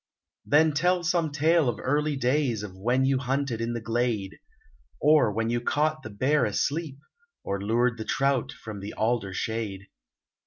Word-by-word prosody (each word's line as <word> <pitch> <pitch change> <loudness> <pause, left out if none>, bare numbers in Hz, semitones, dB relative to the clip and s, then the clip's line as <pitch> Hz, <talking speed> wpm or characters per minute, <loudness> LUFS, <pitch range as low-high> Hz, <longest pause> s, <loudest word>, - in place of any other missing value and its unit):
Then 155 +2 +5
tell 180 +4 +2
some 170 -2 +1
tale 155 0 +3
of 115 - -4
early 150 +2 0
days 125 -4 0
Of 95 -3 -8
when 120 +7 +1
you 135 -1 +2
hunted 130 -2 -2
in 115 +1 -2
the 120 - -3
glade, 115 -3 -2 0.6
Or 150 -7 +4
when 115 +2 -1
you 120 0 0
caught 155 +5 0
the 110 - -8
bear 130 +8 +1
asleep, 140 +7 -1 0.5
Or 100 0 -3
lured 115 +3 +1
the 110 - -4
trout 135 0 0
from 110 -7 -9
the 100 +2 -7
alder 110 -3 0
shade. 100 -1 -4
125 Hz, 165 wpm, -26 LUFS, 110-150 Hz, 0.6 s, Then